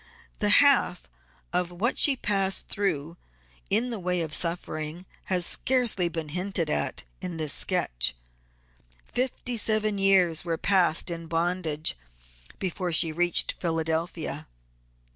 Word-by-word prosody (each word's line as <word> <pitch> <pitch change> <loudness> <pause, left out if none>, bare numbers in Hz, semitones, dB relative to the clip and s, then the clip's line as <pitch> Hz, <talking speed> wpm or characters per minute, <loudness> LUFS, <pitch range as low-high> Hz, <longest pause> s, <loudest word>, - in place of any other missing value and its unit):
The - - +1 0.2
half - - +2 0.5
of 180 -1 0
what 190 +8 -1
she 280 - +4
passed 195 -5 0
through 170 -5 -2 0.5
in 235 +4 +2
the 225 - -3
way 180 -1 -1
of 160 -2 -3
suffering 165 0 -3 0.2
has 180 -2 +1
scarcely 240 -9 +1
been 165 -2 -5
hinted 180 -1 -2
at - - -2 0.2
in 175 -2 -5
this 155 -3 +1
sketch. - - +2 0.9
Fifty 250 -1 -2
seven 215 -1 +2
years 185 -4 +3
were 165 -2 -2
passed 180 -3 +2
in 165 -1 -6
bondage 165 -2 -1 0.6
before 180 -1 -3
she 165 0 +5
reached 175 +2 +1
Philadelphia. 160 -2 -3
175 Hz, 125 wpm, -26 LUFS, 160-195 Hz, 0.9 s, she